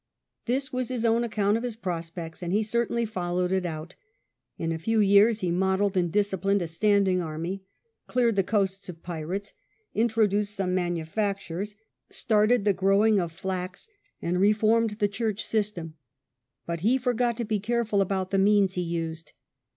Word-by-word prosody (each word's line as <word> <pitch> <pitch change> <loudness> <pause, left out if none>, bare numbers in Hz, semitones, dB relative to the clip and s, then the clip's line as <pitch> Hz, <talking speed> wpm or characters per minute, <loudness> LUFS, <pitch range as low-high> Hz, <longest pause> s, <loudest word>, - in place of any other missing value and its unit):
This 265 +3 -1
was 255 -1 -2
his 245 -2 -2
own 230 +1 +3
account 210 -2 +1
of 230 - -5
his 245 -3 -3
prospects, 170 -5 -5
and 175 -1 -3
he 210 +3 +2
certainly 235 +1 0
followed 180 -3 -1
it 190 -1 +1
out. 160 +1 -6 0.6
In 165 0 -2
a 165 - -2
few 225 +6 +1
years 205 +2 +5
he 180 -2 0
modelled 190 +2 +1
and 175 -2 +1
disciplined 200 -1 +1
a - - -3
standing 190 +1 +2
army, 165 +4 -4 0.5
cleared 240 -3 +2
the 195 - +4
coasts 195 -1 -1
of 170 -2 -9
pirates, 175 +4 -5 0.4
introduced 210 -2 +1
some 190 -3 -1
manufactures, 185 +2 -2 0.3
started 215 -1 +2
the 205 - +4
growing 195 +3 +3
of 170 -2 -2
flax, 185 - -5 0.4
and 175 +1 0
reformed 215 +1 +3
the 210 -2 +2
church 215 0 -2
system. 200 -7 -2 0.7
But 170 0 -3
he 225 +9 +3
forgot 245 -2 0
to 235 - -2
be 215 -1 0
careful 220 -1 0
about 190 -1 -1
the 195 - +2
means 200 -1 +4
he 180 - -1
used. 165 -2 -4
200 Hz, 165 wpm, -27 LUFS, 180-220 Hz, 0.7 s, years